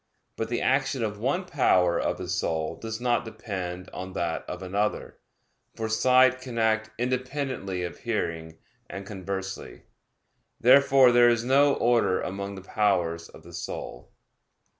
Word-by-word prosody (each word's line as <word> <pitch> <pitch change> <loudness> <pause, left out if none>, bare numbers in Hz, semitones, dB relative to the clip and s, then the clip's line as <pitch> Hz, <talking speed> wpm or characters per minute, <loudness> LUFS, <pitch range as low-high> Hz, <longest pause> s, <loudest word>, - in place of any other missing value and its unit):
But 115 - -3
the 120 - -1
action 135 -2 +1
of 105 -1 -3
one 140 - -1
power 90 - +2
of - - -1
the - - -6
soul 80 -1 -1
does 110 0 -6
not 120 -1 +1
depend 95 -5 -6
on 95 0 -6
that 85 -2 -2
of - - -6
another; 100 +3 -2 0.6
for 110 - -3
sight 130 +2 +4
can 125 -3 -7
act 110 -1 +1
independently 125 -6 -2
of 85 - -6
hearing, 80 -8 -3 0.3
and 100 0 -7
conversely. 95 -1 -6 0.8
Therefore 135 0 +6
there 120 0 +6
is 120 -1 +1
no 140 +2 +4
order 120 -6 +2
among 100 +1 -4
the 95 - -9
powers 90 -6 0
of 80 - -15
the 85 +1 -13
soul. - - -7
110 Hz, 145 wpm, -26 LUFS, 95-125 Hz, 0.8 s, Therefore